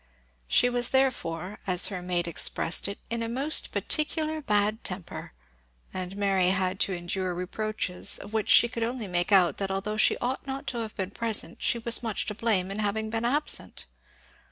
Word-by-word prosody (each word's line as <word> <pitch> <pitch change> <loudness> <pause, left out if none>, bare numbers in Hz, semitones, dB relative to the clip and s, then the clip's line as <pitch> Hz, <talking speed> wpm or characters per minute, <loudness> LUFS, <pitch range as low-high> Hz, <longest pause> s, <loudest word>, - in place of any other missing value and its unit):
She 245 - +4
was 245 -1 +1
therefore, 210 -9 -1
as 180 -2 +5
her 185 -3 -5
maid 175 -1 -2
expressed 165 +1 +2
it, 200 - -6
in 230 0 -2
a 230 - -3
most 275 +6 0
particular 310 0 0
bad 210 -3 +1
temper; 180 -1 -6 0.6
and 185 0 -5
Mary 195 -3 +1
had 190 0 -1
to 195 - 0
endure 180 +1 -3
reproaches, 185 0 0
of 205 - -11
which 220 -1 -1
she 235 - +7
could 230 0 -6
only 235 0 -2
make 175 +1 -1
out 185 -3 +4
that 195 -1 -3
although 195 +2 -3
she - - +3
ought 260 +3 -3
not 270 0 -5
to 240 - -4
have 220 -1 -5
been 190 -1 -3
present 225 0 +1
she 240 - +1
was 235 0 +1
much 225 -4 -2
to 210 - -3
blame 205 -4 0
in 200 - -5
having 215 +1 -2
been 225 +1 -2
absent. 290 +5 0
210 Hz, 185 wpm, -27 LUFS, 185-235 Hz, 0.6 s, she